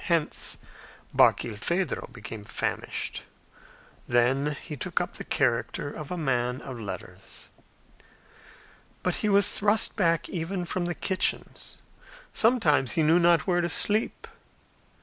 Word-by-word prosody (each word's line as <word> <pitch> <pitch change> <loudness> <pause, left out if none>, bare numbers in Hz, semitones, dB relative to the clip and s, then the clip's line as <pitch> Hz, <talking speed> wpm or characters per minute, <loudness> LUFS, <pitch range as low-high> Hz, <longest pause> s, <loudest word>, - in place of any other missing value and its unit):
Hence 170 -3 +1 0.6
Barkilphedro 130 - +1
became 115 -3 -8
famished. - - -3 0.9
Then 135 +5 +2
he 155 - -7
took 135 - -2
up - - -3
the - - -6
character 145 - 0
of 150 -3 -7
a 180 - -3
man 125 -4 0
of 130 -3 -7
letters. 105 -3 -8 1.5
But 180 - 0
he 210 - 0
was 200 0 +6
thrust 210 +2 +2
back 165 -5 +1
even 180 +1 -3
from 175 +1 -2
the 175 0 -2
kitchens. 190 -1 -2 0.6
Sometimes 175 - +3
he 160 - +2
knew 160 +3 +5
not 170 -1 +4
where 175 -2 +2
to 175 - -1
sleep. 210 +6 +2
165 Hz, 125 wpm, -27 LUFS, 135-180 Hz, 1.5 s, was